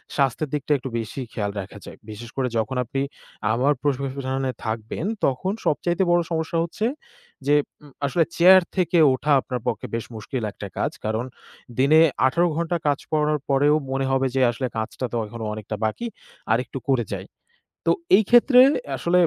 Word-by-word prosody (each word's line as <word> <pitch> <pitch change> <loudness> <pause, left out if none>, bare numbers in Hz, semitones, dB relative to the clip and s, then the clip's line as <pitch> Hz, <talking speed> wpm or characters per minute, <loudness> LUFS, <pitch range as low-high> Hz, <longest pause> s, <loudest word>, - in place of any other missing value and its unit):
স্বাস্থ্যের 140 +1 +1
দিকটা 150 0 -2
একটু 130 0 -6
বেশি 115 +4 -5
খেয়াল 100 -2 -2
রাখা 95 +2 -10
যায়। - - -10
বিশেষ 115 +2 -8
করে 130 -2 0
যখন 110 +4 -1
আপনি 135 +3 -3 0.5
আবার 130 +6 +3
পেশায় 135 -1 -1
থাকবেন 110 +7 -3 0.2
তখন 135 +9 0
সবচাইতে 175 +5 +1
বড় 175 0 +4
সমস্যা 160 +1 -1
হচ্ছে 190 +6 -3 0.6
যে 145 - +5 0.3
উ 150 - -13 0.2
আসলে 140 +5 +2
chair 185 +2 +8 0.2
থেকে 180 -1 +2 0.2
ওঠা 145 +3 -1
আপনার 125 -2 -4
পক্ষে 105 - -2
বেশ 115 - -3
মুশকিল 115 +2 -5
একটা 100 - -8
কাজ। - - 0
কারণ 110 +3 -1 0.5
দিনে 150 +4 +6 0.3
১৮ 170 +7 +2
ঘণ্টা 170 +1 0
কাজ 145 -1 +2
করার 150 -1 +1
পরেও 145 +2 +4 0.2
মনে 135 0 0
হবে 135 0 +2
যে 130 - +2
আসলে 125 +2 -3
কাজটা 110 +3 -3
তো - - -4
এখনও 115 +1 -7
অনেকটা 110 0 -5
বাকি, 110 - -2 0.5
আরেকটু 120 +3 0
করে 130 -3 +3
যাই। - - -5 0.6
তো - - +4 0.3
এই 220 - +4
ক্ষেত্রে 250 +1 +7 0.4
আসলে 170 +7 +2
135 Hz, 170 wpm, -23 LUFS, 120-160 Hz, 0.6 s, chair